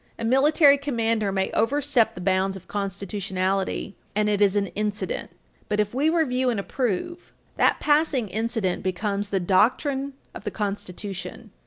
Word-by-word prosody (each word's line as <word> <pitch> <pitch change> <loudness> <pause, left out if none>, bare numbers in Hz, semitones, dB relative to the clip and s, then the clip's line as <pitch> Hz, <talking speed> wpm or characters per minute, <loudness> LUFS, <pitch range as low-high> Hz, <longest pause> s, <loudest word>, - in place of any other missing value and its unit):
* - - -37
A - - -4
military 280 +3 +5
commander 230 -7 0
may 190 0 -1
overstep 270 0 +2
the 180 - -7
bounds 190 +1 +1
of 185 - -15
constitutionality, 195 -1 -2 0.2
and 210 0 +2
it 205 -1 +1
is 200 -1 +4
an 205 -1 +2
incident. 210 - -2 0.4
But 210 0 0
if 210 +1 0
we 285 +5 +2
review 260 -6 +1
and 230 -4 0
approve, 255 - -3 0.3
that - - +3
passing 295 -6 +2
incident 220 -2 -1
becomes 200 +2 -2
the 195 - 0
doctrine 260 - +1 0.2
of - - -9
the 210 - -2
Constitution. 200 -2 -5
210 Hz, 155 wpm, -25 LUFS, 195-260 Hz, 0.4 s, military